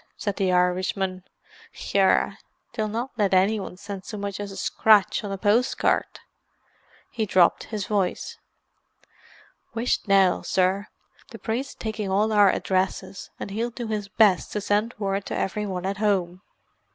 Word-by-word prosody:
said 205 -2 -2
the 190 -2 +1
Irishman. 185 +1 0 0.7
"Yerra, 195 -1 +3 0.3
they'll 215 -1 -1
not 235 +5 -3
let 195 -2 +3
anyone 195 0 +1
send 200 -1 -7
so 210 +2 -7
much 200 -1 -4
as 205 -1 -5
a 195 - -9
scratch 215 -1 +3
on 205 - -4
a 195 - -3
post 215 +5 +2
card." - - 0 0.9
He 220 -3 -2
dropped 185 -2 +3
his 210 -4 -4
voice. 200 -4 -2 1.4
"Whisht 230 -1 -1
now, 195 -2 +4
sir: 190 +2 0 0.4
the - - -9
priest's 245 +4 -3
taking 215 -2 -4
all 210 +3 +1
our 205 -2 +6
addresses, 190 0 -2
and - - -6
he'll 230 +4 -2
do 240 0 -6
his 210 -2 -2
best 205 -3 +3
to 210 - -1
send 210 +3 0
word 195 -1 -1
to - - -3
every 210 +2 -2
one 185 -2 -4
at 195 +1 -2
home." 190 -4 0
200 Hz, 155 wpm, -25 LUFS, 190-215 Hz, 1.4 s, our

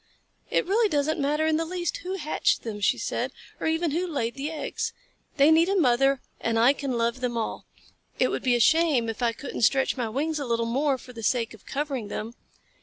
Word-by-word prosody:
"It - - +1
really 425 +4 +2
doesn't 305 -1 0
matter 295 +2 +1
in 315 -1 +2
the 325 - 0
least 345 0 -3
who 370 +2 -5
hatched 310 -5 0
them," 210 -3 -5
she - - +3
said, - - -2 0.3
"or - - -2
even 320 0 +1
who 350 +5 -1
laid 240 -8 -2
the 280 +2 -4
eggs. 315 -2 -3 0.4
They 285 +2 +6
need 330 +3 +5
a 395 - +1
mother 270 -1 +3 0.2
and 230 0 0
I 240 +4 +6
can 280 -2 -3
love 235 +2 0
them 240 -2 -1
all. 225 - -4 0.5
It - - +3
would - - -2
be 250 -2 +2
a - - +1
shame 305 -3 +3
if 225 +2 -5
I 235 -1 +3
couldn't 240 +3 -7
stretch 265 +4 +3
my 235 -3 -1
wings 300 +6 -1
a 285 - -3
little 230 -1 0
more 270 +4 +1
for 250 0 -13
the 230 - -8
sake 230 0 0
of 220 - -17
covering 275 -6 -3
them." 215 +3 -5
275 Hz, 225 wpm, -26 LUFS, 235-315 Hz, 0.5 s, They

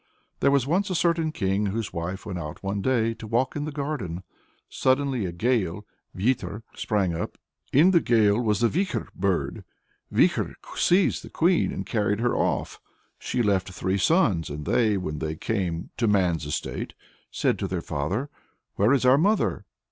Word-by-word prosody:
There - - +4
was 140 -3 +3
a 185 +4 +1
certain 165 -2 +1
king, 100 -5 0
whose 105 0 -3
wife 85 +4 -4
went 95 -4 -4
out 75 +2 -7
one 100 +1 -2
day 115 -1 +1
to 115 -1 -10
walk 120 +4 0
in 145 0 -2
the 155 - -4
garden. 135 - -4 0.4
"Suddenly 130 -5 +1
a - - -4
gale 105 -1 0 0.3
(vyeter) 115 0 -1
sprang 100 -5 0
up. 85 - -4 0.3
In 160 +8 +6
the 175 - +5
gale 110 -5 +3
was 105 -3 +1
the 120 - +5
Vikhor 185 - -1
bird. 95 -1 -1 0.5
Vikhor - - +2 0.2
seized 185 +2 +3
the - - -10
Queen, 175 +1 +2
and - - -4
carried 105 -2 0
her 120 +1 +1
off." - - -1 0.4
She 125 -1 -1
left 100 -4 +1
three 95 +2 -1
sons, 100 - +2
and 75 0 -6
they, 110 -4 +2
when 75 -5 -4
they 80 0 -3
came 90 -3 -2
to 115 - +1
man's 90 -7 +2
estate, 75 - -4 0.3
said - - 0
to 95 - -1
their 90 -1 -2
father 90 - -3 0.5
"Where 105 +7 +4
is 135 -2 +2
our 130 +2 +6
mother? 205 +6 +1
110 Hz, 170 wpm, -25 LUFS, 95-135 Hz, 0.5 s, In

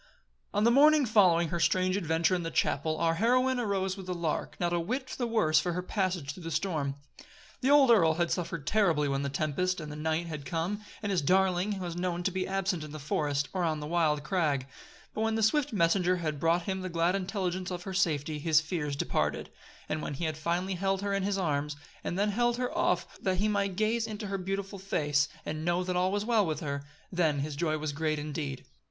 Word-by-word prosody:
On 205 - +1
the 235 - +5
morning 295 +2 +6
following 180 -7 +4
her 170 - -2
strange 185 +2 +2
adventure 165 -2 +1
in 180 - +1
the 165 - -3
chapel, 155 0 0
our 165 -1 +2
heroine 250 +7 +2
arose 195 -4 -1
with 190 -2 -9
the 180 - -2
lark, 165 -3 -3
not 175 -1 0
a 175 - +2
whit 255 +10 -3
the 245 - 0
worse 160 -9 +3
for 175 +2 -1
her 180 +1 -3
passage 180 -7 -1
through 185 - -11
the 165 - -5
storm. 155 -4 -1 0.7
The 265 - +2
old 285 -3 +7
earl 165 -8 +5
had 170 0 0
suffered 170 -4 -3
terribly 170 -9 +2
when 135 0 0
the 140 - -2
tempest 155 +6 -1
and 150 -2 -6
the - - -6
night 160 +2 -1
had 155 -4 -6
come, 175 +6 -2 0.2
and 205 - -1
his 185 -4 +2
darling 190 +4 +2
was 175 -3 -4
known 175 0 -2
to 190 - +1
be 185 0 -2
absent 190 -3 -1
in 150 -1 -8
the - - -5
forest, 145 0 -1
or 185 -2 0
on 160 -2 0
the 150 - -5
wild 155 -2 +1
crag; 150 -6 0 0.5
but 215 - -3
when 225 0 +1
the 220 - +1
swift 290 +6 +2
messenger 180 -1 +2
had 155 -4 -3
brought 165 +2 +2
him 190 0 -3
the 185 - -4
glad 170 +1 +1
intelligence 185 -2 -2
of 175 -1 -5
her 190 - -5
safety, 155 -5 0
his 155 0 +4
fears 160 -3 -3
departed; - - -1 0.4
and 155 - -2
when 145 - -4
he 165 - -3
had 155 -1 -1
finally 175 +4 -1
held 195 +1 -1
her 200 0 -1
in 195 - +1
his 195 +1 0
arms, 150 -5 -1 0.3
and 175 - -3
had 205 +2 +2
then - - -2
held 240 +2 +2
her 250 +5 -2
off 340 +1 +1 0.2
that 185 -2 0
he 205 +3 +1
might 200 -2 0
gaze 220 +3 +1
into 210 -1 -5
her 195 -1 -3
beautiful 195 +1 -4
face 150 -6 +1 0.2
and 155 +1 -4
know 175 +2 +1
that 180 0 -2
all 180 +1 +2
was 205 +1 -1
well 225 -3 +3
with 160 -4 -2
her, 140 -2 -3 0.3
then 160 -6 +1
his 150 0 -4
joy 155 +1 0
was 155 -1 -3
great 155 +1 -1
indeed. 145 -2 -4
175 Hz, 230 wpm, -30 LUFS, 155-195 Hz, 0.7 s, old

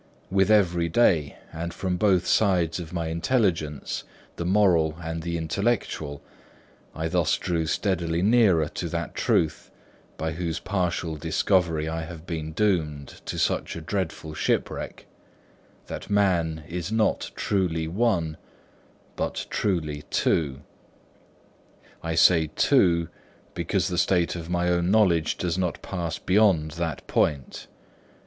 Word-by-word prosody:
With 95 +1 +3
every 90 -5 +3
day, 80 -7 +2 0.2
and 85 +2 -4
from 90 -2 -1
both 95 -2 +3
sides 90 -5 +2
of 80 -2 -7
my 85 -2 -2
intelligence, 85 - 0 0.3
the 85 - -4
moral 90 -6 +3
and 80 -1 -4
the 85 +1 -2
intellectual, 80 -4 -2 0.7
I 80 0 -2
thus 85 -1 +1
drew 85 -3 -1
steadily 85 -2 0
nearer 100 -8 +4
to - - -4
that - - -3
truth, 80 -2 0 0.5
by 80 0 -2
whose 80 0 -3
partial 90 -4 -2
discovery 80 0 +1
I 80 0 -2
have 80 0 -8
been 80 -3 -4
doomed 80 -8 -1
to - - -3
such - - 0
a 85 - -6
dreadful 80 -3 -3
shipwreck: 75 - -2 0.8
that - - -7
man 85 -6 +1
is 90 +2 -4
not 110 -1 +1
truly 85 -5 0
one, 85 -5 0 0.8
but - - -3
truly 80 -7 -1
two. 70 -4 0 1.4
I 80 -1 -2
say 80 -1 +5
two, 85 -2 +3 0.5
because - - 0
the 90 -1 -1
state 90 -1 +2
of 85 -1 -6
my 90 0 0
own 90 0 +1
knowledge 95 -7 +3
does 90 0 -1
not 90 -4 -1
pass 85 -4 -3
beyond 90 -6 +3
that 85 0 -4
point. 70 -3 -1
85 Hz, 130 wpm, -25 LUFS, 80-95 Hz, 1.4 s, say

